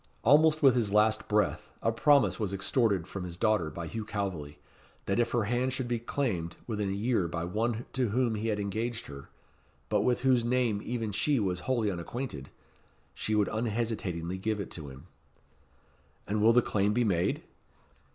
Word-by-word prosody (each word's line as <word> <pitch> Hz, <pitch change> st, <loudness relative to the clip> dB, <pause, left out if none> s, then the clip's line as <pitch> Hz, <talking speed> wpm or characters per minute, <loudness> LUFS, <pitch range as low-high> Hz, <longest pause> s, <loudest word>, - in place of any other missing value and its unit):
Almost 155 Hz, +4 st, +5 dB
with 135 Hz, -2 st, +7 dB
his 110 Hz, -5 st, +1 dB
last 110 Hz, +1 st, +3 dB
breath, 105 Hz, -1 st, 0 dB
a 115 Hz, -, +1 dB
promise 140 Hz, +4 st, +3 dB
was 100 Hz, -3 st, -1 dB
extorted 100 Hz, -2 st, +1 dB
from 95 Hz, +1 st, -6 dB
his 85 Hz, -1 st, -7 dB
daughter 105 Hz, -6 st, +2 dB
by 85 Hz, +3 st, -6 dB
Hugh 110 Hz, +7 st, -4 dB
Calveley, 95 Hz, -9 st, -4 dB, 0.5 s
that 100 Hz, +4 st, 0 dB
if 120 Hz, -, +2 dB
her 120 Hz, -2 st, +1 dB
hand 125 Hz, +4 st, 0 dB
should 130 Hz, -2 st, -3 dB
be 120 Hz, -1 st, -1 dB
claimed 110 Hz, -, -2 dB
within 105 Hz, -4 st, -2 dB
a -, -, -1 dB
year 105 Hz, -2 st, 0 dB
by 85 Hz, 0 st, -3 dB
one 115 Hz, +5 st, -1 dB
to 125 Hz, -4 st, 0 dB
whom 120 Hz, +1 st, +1 dB
he 110 Hz, +1 st, -2 dB
had 105 Hz, -2 st, 0 dB
engaged 110 Hz, +4 st, -3 dB
her, 70 Hz, -1 st, -10 dB, 0.6 s
but 105 Hz, -1 st, +2 dB
with 125 Hz, +2 st, +1 dB
whose 130 Hz, -2 st, +3 dB
name 120 Hz, -4 st, +1 dB
even 115 Hz, -2 st, -3 dB
she 130 Hz, +7 st, +1 dB
was 95 Hz, -4 st, -1 dB
wholly 115 Hz, -5 st, +1 dB
unacquainted, 85 Hz, -, -5 dB, 0.6 s
she 110 Hz, -, -2 dB
would 105 Hz, -1 st, +2 dB
unhesitatingly 105 Hz, -6 st, -2 dB
give 110 Hz, +2 st, -1 dB
it 100 Hz, -, -5 dB
to 75 Hz, -4 st, -6 dB
him." 65 Hz, 0 st, -12 dB, 1.2 s
"And 105 Hz, +1 st, -1 dB
will 110 Hz, +2 st, +6 dB
the 125 Hz, 0 st, +5 dB
claim 100 Hz, 0 st, +1 dB
be 120 Hz, +2 st, +2 dB
made?" 90 Hz, -6 st, 0 dB
110 Hz, 180 wpm, -29 LUFS, 95-120 Hz, 1.2 s, with